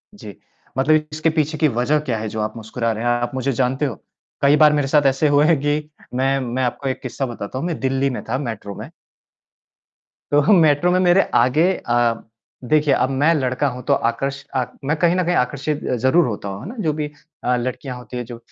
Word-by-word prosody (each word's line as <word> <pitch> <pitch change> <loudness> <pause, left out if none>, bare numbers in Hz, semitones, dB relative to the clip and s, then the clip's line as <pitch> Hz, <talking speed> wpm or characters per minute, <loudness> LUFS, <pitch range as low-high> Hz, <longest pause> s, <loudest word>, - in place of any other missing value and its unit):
जी। 105 - -10 0.4
मतलब 155 +3 +3
इसके 155 +1 0
पीछे 155 -1 -1
की 155 - +3
वजह 130 +5 +1
क्या 125 -7 -2
है 110 - -4
जो 110 - -5
आप 110 +1 -3
मुस्कुरा 115 +1 -2
रहे 110 +2 -4
हैं, 120 - +1
आप 120 0 -1
मुझे 130 +1 -1
जानते 130 +3 0
हो? 120 -7 -3 0.5
कई 140 +1 +5
बार 150 0 +6
मेरे 145 -2 +1
साथ 145 0 +3
ऐसे 135 +3 +3
हुआ 145 +1 +4
हैं 160 -3 +3
कि 150 +1 -1 0.2
मैं 135 +2 +1
मैं 130 0 -2
आपको 130 +2 -2
एक 130 - -4
किस्सा 135 - -3
बताता 120 0 -6
हूँ, 170 - -3
मैं 165 - -3
दिल्ली 135 +1 0
में 125 - -5
था 130 - 0
मेट्रो 110 -7 -5
में - - -8 1.4
तो 145 0 +5
मेट्रो 160 0 +4
में 185 - +3
मेरे 180 +1 +5
आगे 150 +10 +4
अ, 120 -1 +1 0.5
देखिए, 150 +3 +2
अब 130 - +1
मैं 145 +5 +3
लड़का 130 0 0
हूँ 125 0 -7
तो 140 - +2
आकर्ष 135 +4 -3
आक 125 -1 -1
मैं 150 +3 +1
कहीं 175 +2 +3
न 185 - +1
कहीं 175 0 +1
आकर्षित 145 +4 -1
अ, 125 - 0
ज़रूर 130 +9 +3
होता 100 -2 -4
हूँ, 100 +2 -6
है - - -8
ना? 245 - -8
जो 155 -6 0
भी 150 -1 -3 0.4
अ, 125 0 +2
लड़कियाँ 125 +1 -4
होती 125 0 -8
हैं 120 - -4
जो, 120 0 -9
135 Hz, 225 wpm, -20 LUFS, 125-150 Hz, 1.4 s, बार